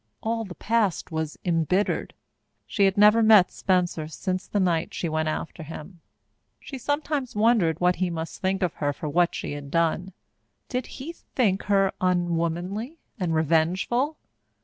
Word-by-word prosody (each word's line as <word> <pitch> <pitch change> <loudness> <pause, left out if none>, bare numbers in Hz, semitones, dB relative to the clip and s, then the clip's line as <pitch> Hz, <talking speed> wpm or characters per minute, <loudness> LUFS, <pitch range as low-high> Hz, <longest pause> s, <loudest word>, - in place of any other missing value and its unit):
All 225 0 -1
the 180 -3 -9
past 210 -3 0
was 160 -1 -3
embittered. 175 +3 0 0.5
She 200 - +2
had 195 0 +1
never 210 +2 +6
met 215 -4 +6
Spencer 175 -4 0
since 185 +3 -3
the 205 - -1
night 175 -4 0
she 175 - -2
went 155 0 0
after 160 +2 -4
him. 160 +3 -9 0.6
She 270 - -8
sometimes 290 -1 -2
wondered 210 -7 +3
what 180 0 +2
he 185 +1 0
must 165 -1 -5
think 190 0 0
of 175 - 0
her 145 -1 -1
for 150 - -6
what 170 +4 +2
she - - -4
had 145 -1 -6
done. 170 +3 0 0.6
Did 250 -2 -2
he 295 +6 -6 0.2
think 200 -7 +2
her 195 -1 +3
unwomanly 180 - -1 0.2
and 170 -4 0
revengeful? 175 - +1
185 Hz, 155 wpm, -25 LUFS, 165-210 Hz, 0.6 s, never